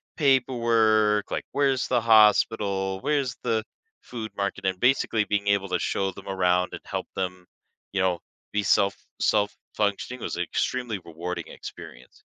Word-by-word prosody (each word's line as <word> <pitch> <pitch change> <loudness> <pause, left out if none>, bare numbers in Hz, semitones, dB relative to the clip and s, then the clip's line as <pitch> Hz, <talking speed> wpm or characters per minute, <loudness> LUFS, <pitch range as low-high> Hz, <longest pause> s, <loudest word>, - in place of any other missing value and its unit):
paperwork, 115 -6 +3
like, - - -2
where's 135 -3 +1
the 125 - +2
hospital, 105 -3 +4
where's 140 -3 0
the 110 -1 0 0.4
food 115 -3 -7
market, 100 0 -2
and 95 -1 0
basically 125 -3 +2
being 100 -1 -1
able 100 -1 +2
to - - 0
show 95 -1 -1
them 95 +1 -12
around 90 -1 +2
and - - -6
help - - -4
them, 90 -1 -3 0.5
you 100 - 0
know, 90 -2 +1 0.3
be 105 0 0
self 100 0 +3 0.2
self-functioning. 105 +3 -1
Was - - -4
extremely 110 +5 -2
rewarding 85 +2 -5
experience. 60 +1 -11
105 Hz, 140 wpm, -26 LUFS, 95-115 Hz, 0.5 s, hospital